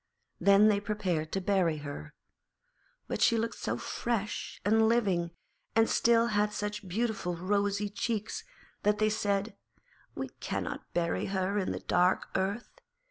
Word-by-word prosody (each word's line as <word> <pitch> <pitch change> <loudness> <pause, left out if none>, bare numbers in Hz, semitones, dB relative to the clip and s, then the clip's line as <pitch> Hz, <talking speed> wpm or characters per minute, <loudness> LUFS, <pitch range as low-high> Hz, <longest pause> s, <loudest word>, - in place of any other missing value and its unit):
Then 200 +1 +6
they 205 -2 +4
prepared 190 -7 -2
to 195 - +1
bury 180 -5 +2
her, 145 0 -7 0.9
but - - -3
she 230 - +5
looked 230 +1 -2
so - - -2
fresh 220 -3 -3
and 220 +1 +4
living, 195 -8 +2 0.5
and 225 0 +5
still 230 0 +4
had 210 0 +2
such 210 -1 -4
beautiful 195 -2 -1
rosy 200 +3 0
cheeks, 220 - -3 0.4
that 210 0 +2
they 215 0 +2
said, 205 0 -1 0.6
'We - - -4
cannot - - -4
bury 170 -1 0
her 195 +1 0
in 190 - -1
the - - -4
dark 180 +1 +2
earth.' 195 +5 -3
205 Hz, 140 wpm, -30 LUFS, 190-215 Hz, 0.9 s, Then